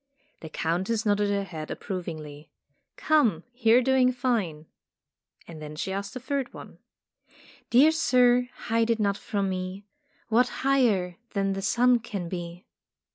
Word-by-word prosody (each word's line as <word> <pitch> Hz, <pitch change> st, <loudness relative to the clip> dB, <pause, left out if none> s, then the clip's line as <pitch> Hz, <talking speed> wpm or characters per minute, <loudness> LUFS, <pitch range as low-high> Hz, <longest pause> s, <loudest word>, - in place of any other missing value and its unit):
The 160 Hz, -, -9 dB
Countess 185 Hz, +9 st, -1 dB
nodded 205 Hz, 0 st, +2 dB
her 200 Hz, 0 st, 0 dB
head 160 Hz, -5 st, -7 dB
ap -, -, -5 dB
provingly. 155 Hz, -5 st, -6 dB, 0.5 s
"Come, 235 Hz, -, +2 dB
you 230 Hz, -1 st, +4 dB
are -, -, +5 dB
doing 260 Hz, 0 st, +3 dB
fine,'' 225 Hz, -12 st, -1 dB, 0.8 s
and 160 Hz, -2 st, -10 dB
then 150 Hz, 0 st, -8 dB
she 180 Hz, +5 st, -3 dB
asked 200 Hz, +2 st, -5 dB
a -, -, -4 dB
third 270 Hz, 0 st, -3 dB
one: -, -, -11 dB, 0.9 s
"Dear 275 Hz, +6 st, +6 dB
sir, 250 Hz, -5 st, +3 dB
hide 230 Hz, 0 st, -1 dB
it 230 Hz, -1 st, +1 dB
not 200 Hz, -2 st, +1 dB
from 200 Hz, -1 st, -2 dB
me 185 Hz, +1 st, -4 dB, 0.4 s
What 245 Hz, +2 st, +3 dB, 0.2 s
higher 215 Hz, -11 st, +2 dB, 0.2 s
than 195 Hz, 0 st, +1 dB
the 195 Hz, -, -4 dB
sun 245 Hz, +4 st, +3 dB
can 200 Hz, -7 st, -6 dB
be?" 175 Hz, 0 st, -7 dB
205 Hz, 150 wpm, -26 LUFS, 180-245 Hz, 0.9 s, Dear